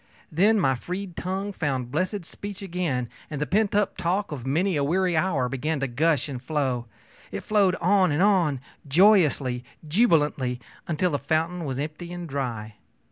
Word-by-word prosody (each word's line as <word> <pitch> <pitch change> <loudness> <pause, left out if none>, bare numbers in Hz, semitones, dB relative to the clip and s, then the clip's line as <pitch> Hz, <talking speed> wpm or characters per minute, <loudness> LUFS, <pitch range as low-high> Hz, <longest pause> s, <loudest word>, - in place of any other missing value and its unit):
Then 205 +7 +4
my 135 -7 +3
freed 180 +7 -5
tongue 195 +3 -3
found 130 -8 -2
blessed 185 +4 -1
speech 200 +2 -8
again, 170 -10 -2 0.2
and 150 - -4
the 150 - 0
pent 205 +5 +1 0.3
talk 185 +3 0
of 135 -4 -5
many 175 +7 +1
a 145 - +1
weary 180 +4 +1
hour 155 -6 +1
began 140 +4 -2
to - - +1
gush 145 +3 +1
and 130 -4 -6
flow. 130 -4 -1 0.4
It - - -4
flowed 200 -4 +3
on 185 0 +3
and 150 +6 +2
on, 175 -10 +3 0.3
joyously, 150 - +4 0.2
jubilantly, 150 - +2 0.3
until 170 +2 0
the 145 - 0
fountain 165 +5 -1
was 135 -2 -3
empty 155 +4 -5
and 175 -1 -6
dry. 115 -7 -4
160 Hz, 165 wpm, -25 LUFS, 135-185 Hz, 0.4 s, Then